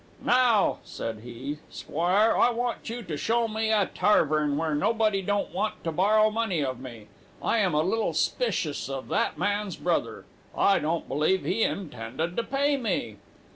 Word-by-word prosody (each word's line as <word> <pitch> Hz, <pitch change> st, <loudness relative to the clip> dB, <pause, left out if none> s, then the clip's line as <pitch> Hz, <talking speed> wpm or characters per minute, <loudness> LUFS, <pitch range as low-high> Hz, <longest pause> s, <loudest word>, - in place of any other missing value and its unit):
"'Now,' 245 Hz, -4 st, +3 dB
said 110 Hz, -1 st, -5 dB
he, 125 Hz, +6 st, -7 dB
'squire, 185 Hz, +8 st, +1 dB
I -, -, +4 dB
want 240 Hz, -1 st, -3 dB
you 235 Hz, +1 st, -5 dB
tu 170 Hz, -6 st, -5 dB
show 230 Hz, +7 st, +1 dB
me 220 Hz, 0 st, -1 dB
a 210 Hz, -3 st, +3 dB
tarvern 155 Hz, -7 st, +2 dB
where 160 Hz, 0 st, -1 dB
nobody 215 Hz, +4 st, +1 dB
won't 205 Hz, +2 st, -1 dB
want 215 Hz, -, -2 dB
tu 165 Hz, -, -1 dB
borrow 215 Hz, +6 st, +3 dB
money 215 Hz, -8 st, 0 dB
of 130 Hz, -2 st, -3 dB
me. 120 Hz, -5 st, -10 dB, 0.3 s
I 230 Hz, -, +1 dB
am 185 Hz, -7 st, +1 dB
a 155 Hz, -, +3 dB
little 220 Hz, +6 st, 0 dB
'spicious 155 Hz, -, -1 dB
of 135 Hz, -1 st, -5 dB
that -, -, 0 dB
man's 205 Hz, +2 st, -1 dB
brother. -, -, -2 dB, 0.3 s
I 200 Hz, -, +4 dB
don't 160 Hz, +3 st, -2 dB
believe 155 Hz, +7 st, +1 dB
he 205 Hz, +5 st, 0 dB
intended 160 Hz, -, -3 dB
to -, -, +1 dB
pay 280 Hz, +3 st, +1 dB
me.' 180 Hz, -, -2 dB
190 Hz, 170 wpm, -27 LUFS, 150-220 Hz, 0.3 s, I